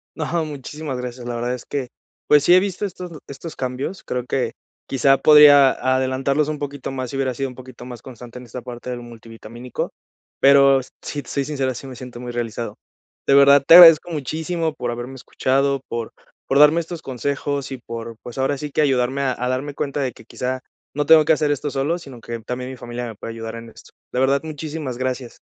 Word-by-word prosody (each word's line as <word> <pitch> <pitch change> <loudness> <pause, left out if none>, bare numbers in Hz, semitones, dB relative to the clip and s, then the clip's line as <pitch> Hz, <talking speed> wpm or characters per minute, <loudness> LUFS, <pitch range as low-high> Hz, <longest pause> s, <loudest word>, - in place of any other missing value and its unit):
No, 160 - -3 0.2
muchísimas 145 -1 -6
gracias. 125 0 -6
La 120 0 -4
verdad 120 +1 -2
es 125 - -7
que, 140 -3 -3 0.4
pues, 150 -1 +5
sí 175 - +5
he 180 - +8
visto 195 +1 -2
estos 180 -2 -7 0.2
estos 140 +4 -8
cambios. 130 +9 -4
Creo 125 -1 -3
que 125 -2 -1 0.3
quizá 135 0 +3
podría 145 -3 +8
adelantarlos 130 +3 0
un 150 -1 -4
poquito 145 -2 -5
más 130 -2 -4
si - - -6
hubiera 135 -1 0
sido 135 +2 -3
un 125 - -12
poquito 130 -1 -12
más 125 -2 -9
constante 125 -1 -11
en 125 - -9
esta 120 +2 -8
parte 120 +1 -8
del 125 -1 -4
multivitamínico. 115 +1 -8 0.5
Pero 140 -1 +6 0.2
si 145 -1 -5
te - - -14
soy 140 -1 -1
sincero, 135 -3 -2
sí 135 - -9
me 130 - -9
siento 125 -1 -9
muy 125 0 -6
realizado. 115 -2 -4 0.5
De - - +3
verdad 140 0 +7
te 165 - +9
agradezco 170 -1 +9
muchísimo 160 +2 -2
por 120 -4 -4
haberme 120 +2 -6
escuchado, 135 +2 0
por, 115 -1 -4 0.4
por 135 - +2
darme 150 +3 +6
estos 170 0 -8
consejos 140 +1 -3
y 135 - -4
por, 115 -1 -8
pues 120 - -9
ahora 135 +2 0
sí 150 +1 -6
que 155 - +1
ayudarme 135 -1 +1
a 135 -2 +1
a 125 - -2
darme 135 +3 -3
cuenta 145 0 -2
de 130 -2 -1
que 110 - -17
quizá 130 +2 -3 0.3
no 145 +1 -1
tengo 160 +1 +7
que 150 - +2
hacer 150 -1 +1
esto 145 0 -2
solo, 140 +5 -1
sino 135 -7 -11
que 115 0 -6
también 125 +3 -5
mi - - -7
familia 120 0 -6
me 115 -2 -7
puede 115 - -7
ayudar 115 0 -6
en 115 0 -9
esto. - - -17 0.2
La 125 - -1
verdad 135 +1 +2
muchísimas 155 -4 -5
gracias. 130 -1 -4
135 Hz, 215 wpm, -21 LUFS, 125-145 Hz, 0.5 s, te